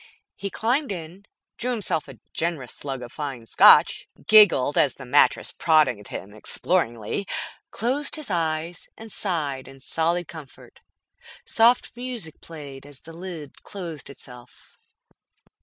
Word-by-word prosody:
He 200 - -4
climbed 245 +6 0
in, 180 +3 -8 0.3
drew 245 - -2
himself 195 -10 -1
a 135 -3 -11 0.2
generous 160 -8 -2
slug 135 -3 -6
of 120 - -9
fine 135 -6 -5
Scotch, - - +6 0.2
giggled 190 -9 +7
as 140 - +3
the 140 - -10
mattress 140 +4 +3
prodded 155 -11 +2
him 100 +1 -7
exploringly, 120 - -1 0.4
closed 260 +7 -1
his 305 -9 -5
eyes 165 0 -1
and 225 0 -9
sighed 150 -11 -2
in 135 0 -13
solid 165 +5 -1
comfort. 160 -6 -12 0.7
Soft 235 +2 +3
music 240 -10 -6
played 145 -5 -10
as 145 -2 -14
the 165 - -12
lid 165 -5 -8
closed 170 -6 -7
itself. 125 -3 -14
160 Hz, 130 wpm, -24 LUFS, 135-200 Hz, 0.7 s, giggled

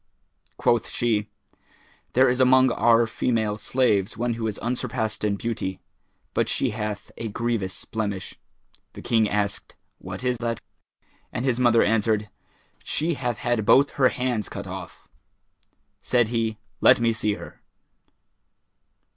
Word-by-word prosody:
Quoth 120 -2 +2
she, 110 -3 0 0.8
"There 130 +2 +5
is 125 +1 +1
among 130 0 +5
our 115 0 +4
female 110 -2 0
slaves 110 -4 +1
one 120 +1 0
who 115 -1 -3
is 110 - -3
unsurpassed 120 -2 -2
in 105 -1 +1
beauty; 100 -4 -3 0.5
but - - +1
she 130 - +1
hath 105 -1 -5
a 115 - -4
grievous 110 -3 -2
blemish." 100 -4 -3 0.6
The - - -10
King 115 -3 +2
asked, 105 -1 -2 0.2
"What 95 +4 -7
is 125 -1 0
that?" 115 -1 -2 0.7
and 125 - -3
his 125 -2 +1
mother 120 -2 +5
answered, 105 -1 +1 0.5
"She 165 +3 0
hath 125 -5 -2
had 120 -4 0
both 135 +7 +5
her 130 -2 +3
hands 125 -4 -2
cut 100 0 -6
off." 95 -1 -9 0.9
Said 120 -3 +2
he, 115 -2 -1 0.2
"Let - - +7
me 115 -1 +2
see 105 -2 0
her." - - -11
115 Hz, 140 wpm, -25 LUFS, 105-125 Hz, 0.9 s, Let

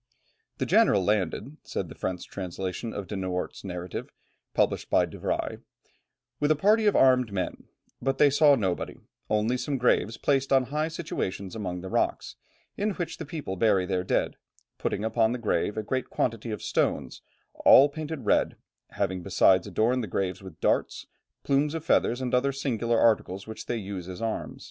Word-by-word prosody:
"The - - -1
general 100 -2 +4
landed," 105 - -1
says - - -4
the - - -10
French 90 -1 -4
translation 95 +3 -5
of 100 - -5
De 105 - -6
Noort's 95 -1 -3
narrative, 90 -2 -5 0.5
published - - +1
by - - +4
De - - -11
Bry, - - -2 0.8
"with 145 - +1
a 155 - +5
party 210 +7 +3
of 205 - +3
armed 125 -4 +4
men, 95 -2 -3 0.4
but 135 0 0
they 145 0 +5
saw 145 0 +6
nobody, 95 -8 -2 0.3
only 110 +4 +1
some 135 +2 -2
graves 115 -2 +2
placed 135 +1 +1
on 135 -1 +5
high 150 +4 -1
situations 115 - -4
among 90 -5 -4
the 95 - -7
rocks, - - -1 0.4
in 205 0 -1
which 175 -2 -4
the 160 - -7
people 145 - -5
bury 100 -3 +3
their 90 -1 -1
dead, - - 0 0.4
putting 105 - -1
upon 110 +1 +2
the - - -2
grave 110 -2 -1
a 110 - -1
great 130 +5 -2
quantity 115 -1 -1
of 105 - -5
stones, - - -1 0.4
all 135 - +9
painted 155 -3 -6
red, - - +2 0.4
having 95 -2 -1
besides 95 0 +3
adorned 120 +4 +1
the - - -4
graves 95 0 -2
with 95 -5 -11
darts, - - 0 0.4
plumes 145 +3 +1
of 160 -1 -5
feathers, 125 -5 +2
and 125 -1 -3
other 130 +2 +3
singular 120 -4 0
articles 100 -4 +2
which 110 - -8
they 120 - -1
use 95 -4 -6
as 90 - -7
arms." 115 -1 -3
115 Hz, 175 wpm, -27 LUFS, 95-135 Hz, 0.8 s, all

